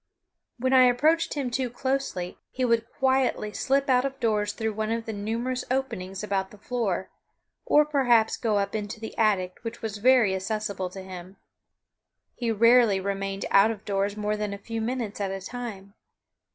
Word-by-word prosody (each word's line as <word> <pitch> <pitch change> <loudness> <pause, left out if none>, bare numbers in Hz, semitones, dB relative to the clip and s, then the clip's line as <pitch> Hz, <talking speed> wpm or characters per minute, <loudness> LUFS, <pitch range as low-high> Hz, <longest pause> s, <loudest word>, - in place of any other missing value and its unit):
When 260 +2 0
I 255 -1 +8
approached 305 +8 +2
him 270 -4 -2
too 255 0 -1
closely 260 -8 -3
he 255 - -1
would 230 -1 +1
quietly 260 -6 +1
slip 275 +1 +1
out 250 -1 +4
of 270 0 -4
doors 210 -4 +1
through 220 +1 -3
one 215 +1 -2
of 230 0 -2
the 220 - -4
numerous 230 +5 -2
openings 215 -8 -3
about 195 -2 -1
the 210 - -15
floor, 205 -5 -2 0.6
or 300 0 +5
perhaps 245 -7 +3
go 220 -3 0
up 200 0 -1
into 215 +1 -4
the 220 - -7
attic 190 -5 +1
which 230 0 -7
was 215 -2 -3
very 245 -3 +5
accessible 200 -1 -3
to 190 +1 -9
him. 185 0 -10 1.0
He 240 -2 -3
rarely 230 -2 +5
remained 195 0 -3
out 200 +2 +6
of 215 -2 -6
doors 200 +1 -1
more 210 0 -1
than 210 -1 -3
a 200 - -16
few 225 -1 -3
minutes 225 -3 -3
at 195 - -1
a 195 0 -4
time. 200 -2 -7
220 Hz, 180 wpm, -26 LUFS, 200-250 Hz, 1.0 s, I